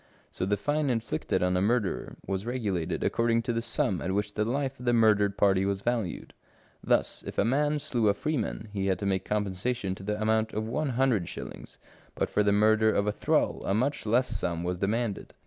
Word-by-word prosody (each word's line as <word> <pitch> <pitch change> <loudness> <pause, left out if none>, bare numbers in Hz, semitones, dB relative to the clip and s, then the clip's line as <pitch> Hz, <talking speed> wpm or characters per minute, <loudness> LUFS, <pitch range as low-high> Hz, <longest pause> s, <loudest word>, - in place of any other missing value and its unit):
So 90 - -3
the 105 +1 +1
fine 145 +6 0
inflicted 115 -6 -1
on 90 0 +2
a 90 - +2
murderer 105 -1 0
was 95 0 -2
regulated 105 -9 -2
according 115 0 +1
to 120 - -1
the 115 - -1
sum 95 -5 -1
at 95 - -2
which 105 +1 -1
the 105 - 0
life 135 +3 -2
of 125 - -8
the 120 - +4
murdered 105 -3 +3
party 95 -2 +3
was 100 0 -1
valued; 115 -6 -2 0.5
thus, - - +1
if - - -7
a - - +3
man 145 +5 +2
slew 130 -7 0
a 100 - +3
freeman, 115 -4 -2
he 100 -1 -1
had 95 -2 +1
to 100 - -5
make 95 -1 0
compensation 105 +1 -1
to 95 - -10
the 105 +2 -3
amount 110 0 +1
of 110 +1 -2
one 150 +5 -1
hundred 125 -10 +2
shillings, - - -9 0.4
but - - -1
for - - +2
the 100 0 +3
murder 110 +1 +4
of 100 - +1
a 105 - +1
thrall - - 0
a 95 - 0
much 130 +1 -1
less 125 +4 +3
sum 85 -1 -1
was 90 0 -2
demanded. 105 +1 -2
105 Hz, 215 wpm, -28 LUFS, 100-120 Hz, 0.5 s, the